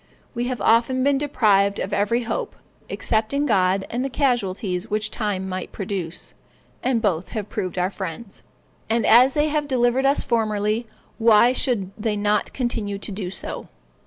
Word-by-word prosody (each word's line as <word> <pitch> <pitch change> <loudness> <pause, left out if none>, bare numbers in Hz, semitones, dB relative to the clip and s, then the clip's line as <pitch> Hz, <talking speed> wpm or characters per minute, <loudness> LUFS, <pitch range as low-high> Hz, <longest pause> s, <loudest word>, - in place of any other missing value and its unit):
We 240 0 -2
have 250 -2 -3
often 235 +5 +3
been 280 0 +3
deprived 205 -8 +2
of 195 - -3
every 220 +4 +1
hope, 430 - -3 0.3
except 220 +2 -1
in 285 +1 +1
God 190 -4 +2
and 245 +2 -1
the 270 - -2
casualties 200 -9 -1
which 215 0 -1
time 205 -4 -2
might 185 -1 -5
produce, 190 -4 -4 0.5
and 245 -3 0
both 185 -4 0
have 210 -2 -4
proved 185 -1 -4
our 180 +2 0
friends. 190 +3 -7 0.5
And 230 0 +1
as 255 +3 +6
they 300 +1 +2
have 300 -1 -1
delivered 255 0 +2
us 280 - +2
formerly, 215 -1 0 0.3
why 230 +2 +5
should 215 -8 0
they 215 0 -2
not 205 0 +1
continue 225 -5 -2
to 200 - -5
do 190 -2 -4
so. 190 - -5
220 Hz, 165 wpm, -23 LUFS, 200-245 Hz, 0.5 s, as